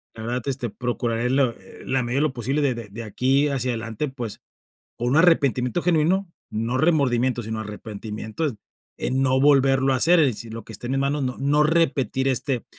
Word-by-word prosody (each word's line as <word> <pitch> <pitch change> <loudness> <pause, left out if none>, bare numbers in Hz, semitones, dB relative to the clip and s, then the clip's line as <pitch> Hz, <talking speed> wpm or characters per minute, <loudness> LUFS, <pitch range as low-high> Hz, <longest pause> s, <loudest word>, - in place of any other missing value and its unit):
la 110 - -8
verdad, 120 +2 -2
este, 130 -3 -2
procuraré 120 -1 -2
la 135 +1 +3
eh, - - -14
en 130 - -5
la 130 - +3
medida 120 +2 -2
de - - +1
lo 150 -4 0
posible 135 +5 -1
de 135 -3 +2
de 115 -3 -6
de 115 +3 -6
aquí 135 +7 +1
hacia 130 -2 0
adelante, 115 +4 -3
pues", 120 -5 -6 0.6
o 120 - -3
un 130 +5 +2
arrepentimiento 155 -3 +3
genuino, 175 +2 +1 0.2
no 115 +4 -2
remordimiento, 130 -6 +2
sino 110 0 -4
arrepentimiento, 110 +5 -5 0.5
en 130 +1 0
no 130 0 +2
volverlo 135 -1 +4
a - - +1
hacer, 170 +7 +5
es 145 - +4
decir, 115 -1 -5
lo 115 - -7
que - - -10
esté 120 +4 -6
en - - -3
mis 135 - 0
manos, 140 +1 0
no 125 -1 -3
no 145 +2 +3
repetir 135 -5 +1
este 130 -1 0
130 Hz, 205 wpm, -23 LUFS, 115-140 Hz, 0.6 s, hacer